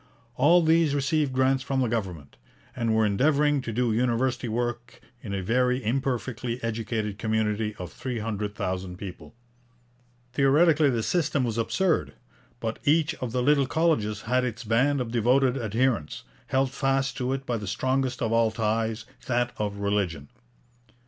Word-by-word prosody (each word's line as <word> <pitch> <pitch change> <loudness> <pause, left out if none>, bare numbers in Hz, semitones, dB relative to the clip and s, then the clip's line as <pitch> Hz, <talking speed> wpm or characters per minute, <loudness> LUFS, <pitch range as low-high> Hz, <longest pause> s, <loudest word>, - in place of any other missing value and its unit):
All 170 +7 +5
these 160 -2 +3
received 145 0 +1
grants 130 +1 +2
from 135 0 -2
the 130 - +2
government, 95 -11 -4 0.4
and 115 -3 0
were 110 0 +3
endeavouring 145 +7 +2
to 115 - -5
do 120 0 0
university 125 +2 0
work 120 +1 -3 0.2
in 105 - -7
a 100 -1 -2
very 125 +5 +2
imperfectly 125 -1 -2
educated 110 -2 -3
community 110 -1 -1
of 90 -6 -8
three 125 -2 -4
hundred 105 -2 -3
thousand 95 -1 -3
people. 95 +3 -9 1.0
Theoretically 145 +3 +4
this 115 -4 -1
system 155 -6 +1
was 115 -2 -1
absurd. 175 +9 0 0.5
But 115 -1 -4
each 155 +1 +3
of 125 -3 -3
the 125 +1 0
little 140 0 +3
colleges 130 -10 +1
had 125 +3 +1
its 120 -2 -4
band 130 +5 +2
of 115 -2 -4
devoted 125 +3 +3
adherents, 115 - -1 0.2
held 135 0 +1
fast 135 0 0
to 125 0 -1
it 135 0 -3
by 120 -2 -1
the 105 -2 -6
strongest 130 +4 -1
of 115 - 0
all 115 -1 +3
ties, 110 0 -1 0.2
that 120 -1 +1
of 105 -1 -2
religion. 100 -8 -1
120 Hz, 155 wpm, -26 LUFS, 110-135 Hz, 1.0 s, All